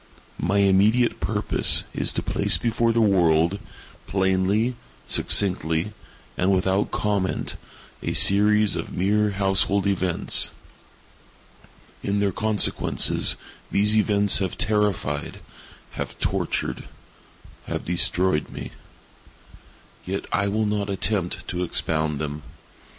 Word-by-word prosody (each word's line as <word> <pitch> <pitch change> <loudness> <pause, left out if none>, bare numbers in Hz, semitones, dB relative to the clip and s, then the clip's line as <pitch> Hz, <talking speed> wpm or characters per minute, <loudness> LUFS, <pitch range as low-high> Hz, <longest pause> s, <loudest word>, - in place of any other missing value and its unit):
My 95 +4 0
immediate 100 +5 +3
purpose - - +2
is - - -1
to - - -3
place - - +2
before 115 0 0
the 115 0 +1
world, 85 -2 +2 0.5
plainly, 95 +5 0 0.3
succinctly, 90 -1 +1 0.4
and 95 +2 +1
without 95 +1 +1
comment, 100 -3 -2 0.5
a - - -3
series 105 +1 +4
of - - -5
mere 105 +3 +1
household 100 0 +1
events. 95 -3 +2 1.5
In 100 +1 -1
their 100 -1 +1
consequences, 110 +2 +1 0.3
these 105 +2 +3
events 105 -2 +4
have 95 -3 -3
terrified—have 105 -9 -3
tortured—have - - -6
destroyed 90 -1 +1
me. - - -8 1.3
Yet 95 +2 -4
I 100 - +1
will 110 +2 0
not 105 -1 -2
attempt 100 -2 -2
to 90 0 -3
expound 80 -3 -1
them. 75 0 -5
100 Hz, 100 wpm, -23 LUFS, 90-105 Hz, 1.5 s, series